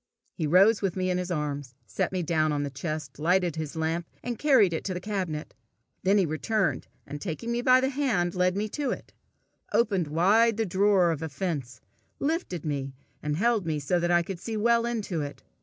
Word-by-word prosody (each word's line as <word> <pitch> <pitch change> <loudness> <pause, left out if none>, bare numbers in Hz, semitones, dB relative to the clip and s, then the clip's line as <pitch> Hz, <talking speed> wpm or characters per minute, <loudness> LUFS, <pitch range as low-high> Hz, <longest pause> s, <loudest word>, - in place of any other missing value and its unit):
He 160 -5 -2
rose 195 +7 +5
with 195 -4 -1
me 185 -1 0
in 180 - 0
his 180 0 -4
arms, 145 -6 -3
set 95 - -2
me 185 -2 -1
down 155 -1 +1
on 145 -1 0
the 140 - -4
chest, 150 0 -5
lighted 175 +1 +2
his 160 0 -5
lamp, 160 +1 -1 0.2
and 240 -2 -4
carried 255 - +4
it 160 - -2
to 185 - -2
the - - -2
cabinet. 185 -6 -4 0.5
Then 195 +3 +3
he 195 - +4
returned, 160 - -1 0.2
and 145 +1 -7
taking 205 +6 -4
me 240 0 0
by 255 +1 +5
the 265 - +1
hand, 245 -11 0
led 180 +1 +1
me 210 +1 0
to 285 +3 -2
it, - - -5 0.6
opened 195 -8 +2
wide 205 +9 +3
the 225 - +1
drawer 190 -2 +3
of 160 -2 -3
offence, 145 -5 -4 0.4
lifted 285 - -2
me, 140 -3 -3 0.3
and 150 0 -2
held 220 -2 +1
me 155 -1 0
so 150 +5 0
that 175 0 0
I 175 0 +4
could 180 0 -6
see 225 +2 -4
well 235 +2 +3
into 210 -8 -2
it. 145 0 -7
180 Hz, 205 wpm, -27 LUFS, 155-210 Hz, 0.6 s, rose